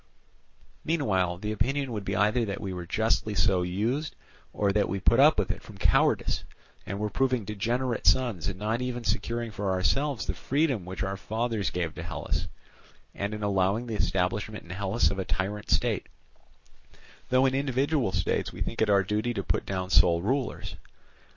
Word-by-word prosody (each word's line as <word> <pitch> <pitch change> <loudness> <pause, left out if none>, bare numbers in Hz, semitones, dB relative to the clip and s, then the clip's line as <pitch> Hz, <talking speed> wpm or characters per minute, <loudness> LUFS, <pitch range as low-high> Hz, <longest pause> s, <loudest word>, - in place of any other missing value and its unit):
Meanwhile 95 - +1
the 105 +3 -4
opinion 135 +4 0
would 105 -3 -3
be 95 - -1
either 105 +4 +3
that 100 -1 -4
we 95 -1 -4
were 90 -1 -6
justly 110 +1 +1
so 95 -4 +3
used, 110 - -1 0.4
or 100 -1 +1
that 105 0 +1
we 95 - -1
put - - +3
up - - +7
with - - +1
it - - -7
from - - -13
cowardice, - - +2 0.4
and 100 - -3
were 105 - 0
proving 130 -2 +1
degenerate 115 +2 -1
sons 110 -4 +3
in 95 - -5
not 110 +4 -1
even 125 -1 -3
securing 115 0 -1
for 105 -1 -3
ourselves 130 +9 +1
the - - -1
freedom 135 - 0
which 95 +2 -4
our 95 0 -2
fathers 110 0 -1
gave 85 -3 -2
to - - -7
Hellas; 85 0 -3 0.7
and 100 +1 -3
in 105 - -6
allowing 100 +3 +1
the 115 - -5
establishment 95 +2 -1
in 85 - -11
Hellas 100 +4 +1
of 100 - -4
a - - 0
tyrant 100 +3 -3
state, - - +1 1.2
though 130 +1 +4
in 130 - +2
individual 135 -3 +1
states 90 -2 0
we - - -10
think 115 - -2
it 110 - +3
our 100 -1 +5
duty 105 +5 -1
to 100 - -2
put - - -1
down 95 -1 -3
sole 85 0 +5
rulers. 130 +3 -2
105 Hz, 185 wpm, -28 LUFS, 95-120 Hz, 1.2 s, up